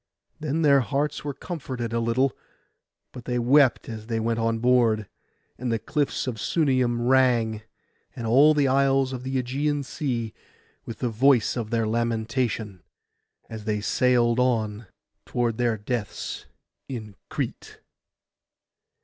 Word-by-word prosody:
Then 155 +1 -1
their 140 -2 +6
hearts 140 +3 -1
were 145 -2 -4
comforted 130 -8 -5
a 115 - +1
little; 115 +3 +1 0.8
but 125 -2 -10
they 125 -1 -1
wept 130 +2 +4
as 110 -1 -7
they 115 -1 -1
went 115 +1 -1
on 115 0 +1
board, 115 -3 +2 0.5
and 125 -1 -2
the 115 - +1
cliffs 145 +5 -1
of 120 -4 -4
Sunium 130 -6 +1
rang, 120 -4 +3 0.5
and 115 - -5
all 140 +7 +5
the 145 -2 +3
isles 135 0 +2
of 125 - -5
the 130 +1 -4
Ægean 140 +3 -1
Sea, 120 -5 -3 0.5
with 115 - -7
the 125 - -1
voice 120 +1 +3
of 115 -3 -3
their 115 -1 0
lamentation, 115 -3 -1 0.7
as 110 -2 -8
they 105 -2 0
sailed 120 +2 +2
on 110 -4 0 0.4
toward 120 -1 -1
their 120 -2 +1
deaths 105 0 -4 0.4
in 110 -6 -6
Crete. - - -5
120 Hz, 140 wpm, -25 LUFS, 115-135 Hz, 0.8 s, their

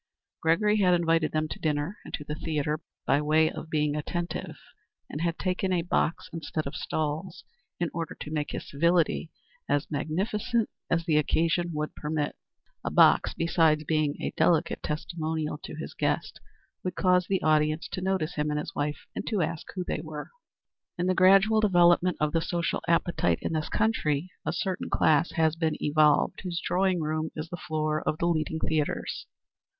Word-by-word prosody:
Gregory 210 +6 +3
had 185 -3 +4
invited 165 -2 +2
them 155 0 0
to - - -7
dinner 150 +5 -1
and - - -10
to 150 - -8
the 150 - -5
theatre, 150 -1 -2 0.3
by 140 +2 +3
way 155 +1 +3
of 160 - -8
being 150 -2 +1
attentive, 170 +3 -4 0.5
and 150 - -4
had 170 -1 0
taken 185 0 -1
a 175 -2 +1
box 170 0 0
instead 155 -1 -3
of 140 - -5
stalls, 160 +3 -3 0.4
in 175 -1 -1
order 165 -1 -4
to 150 - -6
make 150 -2 -2
his - - -5
civility 170 +2 +2 0.4
as 145 +2 0
magnificent 210 - -1 0.2
as 170 -1 +1
the 155 -4 +3
occasion 165 +3 +1
would 150 -1 -3
permit. 150 -1 -2 0.5
A - - -1
box, - - +5
besides 165 -2 +3
being 155 -1 0
a - - -2
delicate 170 0 +2
testimonial 155 0 -3
to - - -7
his - - -7
guest, - - -1 0.4
would 185 - -3
cause 180 -2 +3
the 190 -1 0
audience 155 +1 +2
to 185 - -4
notice 185 -3 0
him 150 0 -1
and 150 - -1
his 150 - -4
wife 145 0 -3
and - - -4
to 210 -6 +1
ask 165 +1 -4
who 185 - -2
they 155 - -3
were. 155 -2 -7 0.7
In 175 - 0
the 185 - +3
gradual 195 +4 +5
development 175 -3 +4
of 150 0 +1
the 165 - +1
social 170 0 -1
appetite 170 - +2
in - - -1
this 155 -1 -1
country 180 -7 0 0.2
a - - +2
certain 185 +2 -2
class 155 +2 +3
has 160 -1 +2
been 160 -2 0
evolved 150 +4 +3
whose 175 -2 -3
drawing 185 -1 +1
room 155 +1 -1
is 155 +1 -5
the 175 - -5
floor 155 -1 0
of 155 - -1
the 170 - -1
leading 160 -2 0
theatres. 155 -2 -2
160 Hz, 180 wpm, -28 LUFS, 155-175 Hz, 0.7 s, box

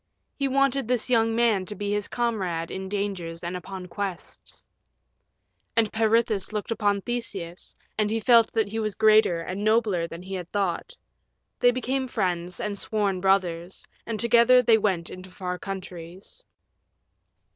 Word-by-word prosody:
He 275 - 0
wanted 275 -2 +1
this 250 0 0
young 225 -1 +3
man 225 -6 +2
to 210 - -6
be 205 -1 -3
his 205 0 -1
comrade 190 -9 -2
in 190 0 -5
dangers 190 -5 -3
and 175 +1 -3
upon 185 +1 -7
quests. 190 -2 -7 1.1
And 220 -2 +2
Peirithous 220 -3 +1
looked 210 +1 -4
upon 205 -3 +1
Theseus, 195 -7 -4 0.2
and 210 -1 +2
he 225 +1 0
felt 230 0 +5
that 220 -3 +1
he 225 +2 -3
was 215 -2 -2
greater 215 -6 +4
and 185 +4 -4
nobler 215 -6 +2
than 170 +1 -9
he 190 +1 -7
had 180 -2 -5
thought. 200 - -2 0.6
They 245 - +6
became 260 +2 -1
friends 180 -6 -2
and 205 -1 -3
sworn 200 -4 0
brothers, 180 -2 0 0.2
and 225 -2 -3
together 235 +2 +5
they 225 -2 +5
went 185 -5 -1
into 185 0 -10
far 180 -1 -5
countries. 185 -2 -8
205 Hz, 155 wpm, -26 LUFS, 185-225 Hz, 1.1 s, They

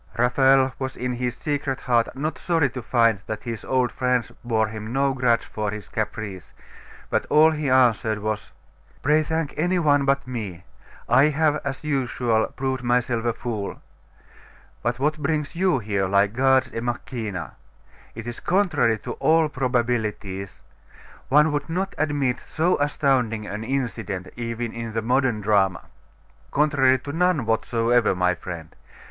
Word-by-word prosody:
Raphael 130 +2 +4
was 130 -1 -4
in 125 0 -2
his 125 0 -3
secret 145 -3 -2
heart 120 -2 +1
not 150 +3 -3
sorry 165 -7 +1
to 125 - -6
find 115 -3 +2
that 110 -1 -5
his 115 -3 -5
old 130 -2 +1
friends 125 -2 0
bore 110 -2 +1
him 110 +1 -7
no 135 +1 +1
grudge 125 -3 +2
for 105 -1 -3
his 105 -1 -7
caprice; 95 -7 -5 0.6
but - - 0
all 155 +1 +6
he 150 -3 -2
answered 120 -4 +3
was 105 0 -3 0.5
'Pray 150 +3 +4
thank 160 -1 -2
any 180 +3 +2
one 145 -4 +3
but 140 -1 +1
me; 105 -9 -6 0.4
I 130 +3 +5
have, 150 0 +2
as 140 +1 -4
usual, 125 -6 0
proved 130 -1 -3
myself 120 -1 0
a 120 - +1
fool. 110 -4 -5 1.0
But 120 0 -1
what 150 +4 0
brings 150 +1 -1
you 185 -3 +2
here, 100 -4 -1
like 100 +1 +2
Gods 130 +1 +3
e - - -2
Machina? 115 - -4 0.6
It 115 0 -7
is 120 -1 -6
contrary 175 - +2
to - - -4
all 160 -1 +3
probabilities. 115 -7 -2 0.7
One 150 +3 +5
would 145 +1 -2
not 190 +4 -2
admit 145 -4 0
so 165 +3 +1
astounding 130 -7 +1
an 105 +1 -5
incident, 115 -7 -3
even 115 -1 -4
in 115 -1 -5
the 115 0 -1
modern 125 -2 +1
drama.' 100 -3 +2 0.6
'Contrary 140 -3 +3
to 140 +3 -7
none 175 -6 +2
whatsoever, 115 0 +2
my 90 0 +2
friend. 85 -2 -8
125 Hz, 155 wpm, -24 LUFS, 110-145 Hz, 1.0 s, all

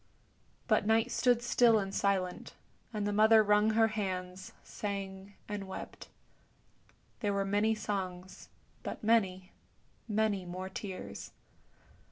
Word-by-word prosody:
But 210 - +2
Night 225 0 +3
stood 245 -1 +2
still 240 -2 +4
and 195 -2 -2
silent, 190 -3 -1 0.4
and 210 -3 -2
the 205 - 0
mother 220 +1 +6
wrung 210 +1 +3
her 225 0 +5
hands, 185 -3 -4
sang, 195 -1 -6
and 205 -2 -5
wept. 190 - -8 1.1
There 205 -3 0
were 200 0 0
many 205 +3 +2
songs, 190 -3 -5 0.3
but - - -6
many, 190 -4 +1 0.6
many 215 -3 0
more 185 +1 -6
tears. 190 -1 -7
205 Hz, 120 wpm, -32 LUFS, 190-220 Hz, 1.1 s, mother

